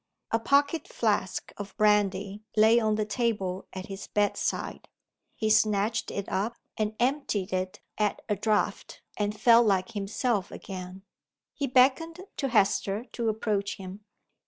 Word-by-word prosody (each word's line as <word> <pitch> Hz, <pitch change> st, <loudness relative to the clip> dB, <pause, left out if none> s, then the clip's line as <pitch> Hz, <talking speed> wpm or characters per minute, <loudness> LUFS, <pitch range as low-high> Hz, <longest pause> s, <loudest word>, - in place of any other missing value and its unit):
A 225 Hz, -, +2 dB
pocket 285 Hz, +5 st, +2 dB
flask 205 Hz, -4 st, -1 dB
of 200 Hz, -1 st, -8 dB
brandy 205 Hz, -1 st, +2 dB, 0.2 s
lay 220 Hz, +2 st, +6 dB
on 215 Hz, -2 st, +1 dB
the 215 Hz, 0 st, 0 dB
table 200 Hz, -4 st, -1 dB
at 185 Hz, 0 st, -6 dB
his 195 Hz, 0 st, -7 dB
bedside. 205 Hz, -1 st, -1 dB, 0.5 s
He 220 Hz, -1 st, 0 dB
snatched 215 Hz, +1 st, +2 dB
it 200 Hz, -, -4 dB
up, 220 Hz, +5 st, -1 dB, 0.2 s
and 215 Hz, 0 st, -1 dB
emptied 240 Hz, -7 st, 0 dB
it 185 Hz, +2 st, -2 dB, 0.2 s
at 210 Hz, -1 st, 0 dB
a 210 Hz, -, +1 dB
draught 210 Hz, +1 st, -1 dB
and 210 Hz, 0 st, -2 dB
felt 235 Hz, -1 st, +6 dB
like 190 Hz, -2 st, +1 dB
himself 205 Hz, 0 st, -1 dB
again. 185 Hz, 0 st, -8 dB, 0.5 s
He 280 Hz, -, -2 dB
beckoned 270 Hz, +7 st, +3 dB, 0.2 s
to 275 Hz, -, 0 dB
Hester 205 Hz, -1 st, +1 dB
to 230 Hz, -2 st, -1 dB
approach 210 Hz, -2 st, -1 dB
him. 195 Hz, +2 st, -9 dB
210 Hz, 140 wpm, -28 LUFS, 195-230 Hz, 0.5 s, lay